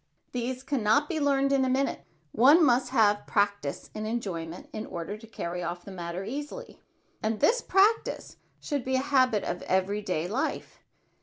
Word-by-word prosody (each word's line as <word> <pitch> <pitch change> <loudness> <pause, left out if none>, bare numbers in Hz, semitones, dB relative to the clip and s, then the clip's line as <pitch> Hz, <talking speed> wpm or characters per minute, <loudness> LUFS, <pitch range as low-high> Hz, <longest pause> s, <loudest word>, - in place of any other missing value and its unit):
These 250 +1 -3
can 275 -2 -1
not 250 +8 +3
be 320 -1 -2
learned 275 -1 +2
in 275 -1 +3
a 260 - +1
minute. 270 +2 0 0.3
One 290 - +6
must 255 -1 +3
have 210 -5 +3
practise 200 -8 -1
in 215 0 -4
enjoyment 180 -7 -4
in 215 - -5
order 170 +4 -5
to 220 +1 -13
carry 180 -5 -5
off 175 0 -5
the 200 - -8
matter 175 0 -5
easily; 290 - -6 0.4
and 215 0 -1
this - - +3
practise 415 +3 +1 0.2
should 285 -4 -3
be 260 +1 -1
a 260 - +1
habit 255 -6 +3
of 175 - -3
every 190 +3 0
day 180 -4 -2
life. 230 +8 -3
225 Hz, 175 wpm, -28 LUFS, 195-275 Hz, 0.4 s, One